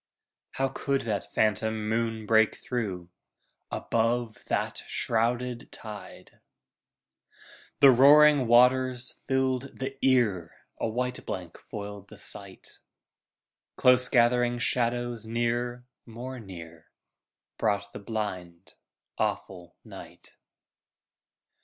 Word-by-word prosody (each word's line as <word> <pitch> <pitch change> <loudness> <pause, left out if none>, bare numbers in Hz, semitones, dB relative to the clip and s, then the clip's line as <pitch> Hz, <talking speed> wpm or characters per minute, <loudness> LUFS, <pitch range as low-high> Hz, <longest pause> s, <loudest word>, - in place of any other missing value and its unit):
How 135 - 0
could 135 +1 -1
that 105 -3 -3
phantom 110 0 0
moon 115 0 -1
break 110 0 +4
through, 95 -8 -4 0.6
Above 115 0 -1
that - - -2
shrouded 120 +2 -1
tide? 105 -4 -9 1.4
The 140 -2 +9
roaring 145 +1 +6
waters 125 +1 +4
filled 130 0 -2
the 135 +1 -6
ear, 110 -11 +2 0.2
A - - 0
white 125 +2 -3
blank 90 -4 -6
foiled 100 -1 -7
the 110 - -13
sight. 100 -1 -6 1.0
Close 125 0 +4
gathering 120 -1 +3
shadows 120 -2 -1
near, 120 +1 -2 0.2
more 125 +3 -7
near, 85 -6 -11 0.7
Brought 100 -2 -1
the - - -7
blind, 95 -5 -6 0.4
awful 90 -2 -3
night. - - -12
115 Hz, 95 wpm, -27 LUFS, 105-125 Hz, 1.4 s, The